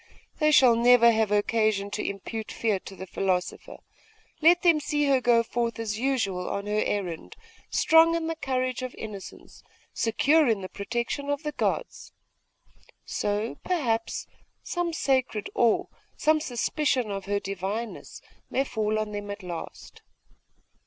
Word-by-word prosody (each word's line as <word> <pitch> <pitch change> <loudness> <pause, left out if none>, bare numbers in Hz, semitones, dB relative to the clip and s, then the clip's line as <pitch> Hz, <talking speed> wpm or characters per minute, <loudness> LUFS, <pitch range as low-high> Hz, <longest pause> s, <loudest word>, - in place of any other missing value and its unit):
They 305 -1 +4
shall 260 -6 +6
never 235 0 +6
have 220 -2 +1
occasion 210 -1 +1
to 210 - -3
impute 215 +3 -5
fear 215 -4 0
to 195 - -11
the 190 +1 -8
philosopher. 185 -1 -2 0.6
Let 345 +3 +5
them 335 -3 +5
see 295 0 0
her 270 -2 +3
go 235 -1 +4
forth 235 0 -2
as 220 -2 -3
usual 225 -9 -1
on 200 - -3
her 210 +1 0
errand, 180 -5 -3 0.3
strong 325 +1 +5
in 335 -1 -1
the 325 0 -2
courage 255 -4 -2
of 255 -1 -5
innocence, 205 -3 -9 0.3
secure 295 +6 +3
in 220 -4 +1
the 185 - -6
protection 235 +7 -3
of 285 +2 -1
the 300 - -2
gods. - - -3 0.9
So, 210 +3 -2
perhaps, 240 -11 -1 0.4
some 350 -1 -2
sacred 260 -8 0
awe, 230 -2 +3 0.3
some 310 0 +3
suspicion 255 -2 0
of 195 -1 -4
her 200 +1 0
divineness, 200 +4 -5 0.3
may 270 - +1
fall 215 -4 -1
on 215 -1 -2
them 205 0 -5
at 200 0 -6
last. 175 -2 -8
230 Hz, 145 wpm, -26 LUFS, 205-275 Hz, 0.9 s, shall